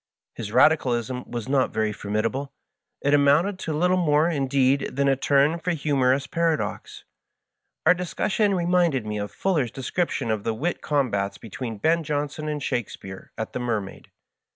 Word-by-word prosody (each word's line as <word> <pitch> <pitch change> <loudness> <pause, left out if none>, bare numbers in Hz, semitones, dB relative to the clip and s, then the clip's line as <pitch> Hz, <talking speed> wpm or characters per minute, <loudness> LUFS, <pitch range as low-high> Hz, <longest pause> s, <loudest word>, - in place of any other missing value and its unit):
His 105 -3 -6
Radicalism 125 -4 +2
was 120 -2 -5
not 135 -1 +2
very 110 -1 0
formidable; 115 +7 -2 0.5
it 145 - +1
amounted 145 +7 +3
to 160 - -4
Uttle 180 +4 +2
more, 150 0 +3
indeed, 135 -3 +1
than 140 +1 +2
a 135 - +4
turn 140 +4 +2
for 180 +1 -1
humorous 140 -3 +1
paradox. 165 +1 -2 0.8
Our - - +7
discussion 190 +3 0
reminded 170 -8 +2
me 105 0 -3
of 105 0 -4
Fuller's 160 -11 0
description 135 - -2
of 110 -2 -2
the 115 - -1
wit 165 +9 -2
combats 100 -9 0
between 115 +3 -6
Ben 165 +10 +2
Johnson 150 +1 -3
and 150 -2 -3
Shakespeare 95 -5 -5
at 110 - -4
the - - -3
"Mermaid." 110 -5 -4
140 Hz, 150 wpm, -24 LUFS, 115-160 Hz, 0.8 s, Our